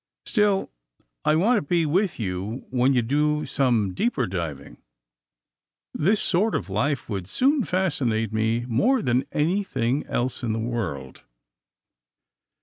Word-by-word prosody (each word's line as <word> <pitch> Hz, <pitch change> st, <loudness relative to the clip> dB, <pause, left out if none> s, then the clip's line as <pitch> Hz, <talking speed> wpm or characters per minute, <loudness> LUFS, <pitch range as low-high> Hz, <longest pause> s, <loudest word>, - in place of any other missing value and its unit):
' -, -, -66 dB
' -, -, -64 dB
Still 210 Hz, -3 st, +1 dB, 0.5 s
I 155 Hz, -, +3 dB
want 215 Hz, +9 st, +3 dB
to -, -, +1 dB
be 165 Hz, +2 st, +1 dB
with 180 Hz, +3 st, 0 dB
you 100 Hz, +4 st, -4 dB
when 125 Hz, +1 st, +3 dB
you 120 Hz, -, +3 dB
do 150 Hz, +4 st, +1 dB
some 115 Hz, -8 st, +1 dB
deeper 180 Hz, -, 0 dB
diving. 80 Hz, -, -5 dB, 1.1 s
This 200 Hz, +7 st, +2 dB
sort 205 Hz, +4 st, +1 dB
of 95 Hz, -, -3 dB
life 130 Hz, +5 st, -1 dB
would 95 Hz, -5 st, -4 dB
soon 270 Hz, -, +2 dB
fascinate 125 Hz, -, 0 dB
me 110 Hz, +2 st, 0 dB
more 220 Hz, -, +2 dB
than 125 Hz, +2 st, +1 dB
anything 150 Hz, -, 0 dB
else 125 Hz, +1 st, -2 dB
in 115 Hz, -3 st, -1 dB
the 110 Hz, -, -2 dB
world. 95 Hz, -, -4 dB
130 Hz, 145 wpm, -24 LUFS, 110-175 Hz, 1.1 s, I